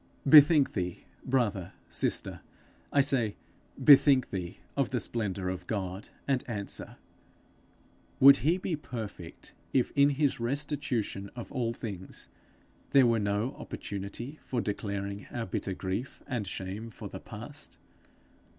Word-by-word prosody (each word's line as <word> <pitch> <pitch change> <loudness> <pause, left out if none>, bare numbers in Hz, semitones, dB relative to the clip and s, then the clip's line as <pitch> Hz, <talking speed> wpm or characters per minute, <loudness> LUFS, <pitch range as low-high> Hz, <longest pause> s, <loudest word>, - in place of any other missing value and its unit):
Bethink 145 0 +8
thee, 90 -1 -3 0.2
brother, 105 -9 0
sister, - - -2 0.5
I 140 - +5
say; 125 -6 +1 0.4
bethink 140 -2 +6
thee 90 -2 -4 0.2
of 140 -2 +1
the 125 - 0
splendour 100 -6 -2
of 90 -1 -5
God, 95 -2 -4 0.2
and 135 -2 +1
answer 105 -4 -3 1.2
Would 140 +1 +9
he 165 +5 +2
be 180 -2 -2
perfect 110 - -8 0.2
if 130 - +2
in 140 0 +6
his 140 -2 +1
restitution 125 -6 -2
of 120 - -7
all 120 -5 -1
things 95 -6 -7 0.6
there 135 -2 +6
were 115 -1 +3
no 105 +4 0
opportunity 100 +9 -6
for 125 - -2
declaring 100 -2 -3
our 120 -2 -3
bitter 95 0 -3
grief 95 +8 -4
and 120 -7 -3
shame 95 +5 -5
for 105 - -8
the - - -8
past? - - -8
115 Hz, 130 wpm, -30 LUFS, 100-135 Hz, 1.2 s, Would